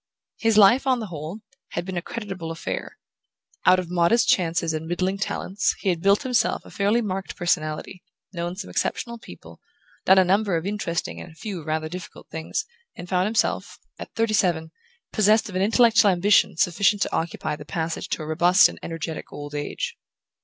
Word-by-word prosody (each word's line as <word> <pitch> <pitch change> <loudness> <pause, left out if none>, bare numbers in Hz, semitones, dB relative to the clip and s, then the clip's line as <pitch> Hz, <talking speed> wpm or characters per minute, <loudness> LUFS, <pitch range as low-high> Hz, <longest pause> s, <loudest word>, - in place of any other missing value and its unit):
His 225 -2 +2
life, 230 +7 +6
on 255 -2 +3
the 225 - -4
whole, 160 +8 -6 0.3
had 170 - -3
been 190 0 -5
a 175 - -1
creditable 190 -6 -6
affair. 165 0 -5 0.7
Out 185 - +7
of 180 -2 -4
modest 180 +7 +3
chances 165 -2 +2
and 160 +1 -4
middling 185 +3 -1
talents 195 0 -1
he 195 - -1
had 170 -2 0
built 200 +5 +3
himself 250 -3 0
a - - -13
fairly 210 +4 +1
marked 195 -2 -4
personality, 170 +1 -2 0.3
known 175 0 -3
some 190 0 -7
exceptional 235 -1 -2
people, - - -13 0.4
done 190 - +6
a 190 - +7
number 195 0 +2
of 165 - -4
interesting 200 -4 -3
and 175 - -10
a - - -18
few 195 -3 -6
rather 155 +1 -2
difficult 180 +2 -9
things, 160 0 -3 0.3
and 175 - -9
found 185 0 +2
himself, 220 +1 -1 0.2
at - - -8
thirty 225 -1 +1
seven, 165 -5 +1 0.4
possessed 215 +1 +3
of 185 - -8
an 185 - +1
intellectual 225 0 +5
ambition 190 0 +3
sufficient 200 +4 +3
to - - -3
occupy 165 -2 -2
the 150 - -10
passage 160 +2 -4
to - - -2
a - - -7
robust 175 +4 +5
and - - -10
energetic 165 -1 -5
old 145 0 -8
age. 145 0 -4
185 Hz, 185 wpm, -24 LUFS, 165-205 Hz, 0.7 s, Out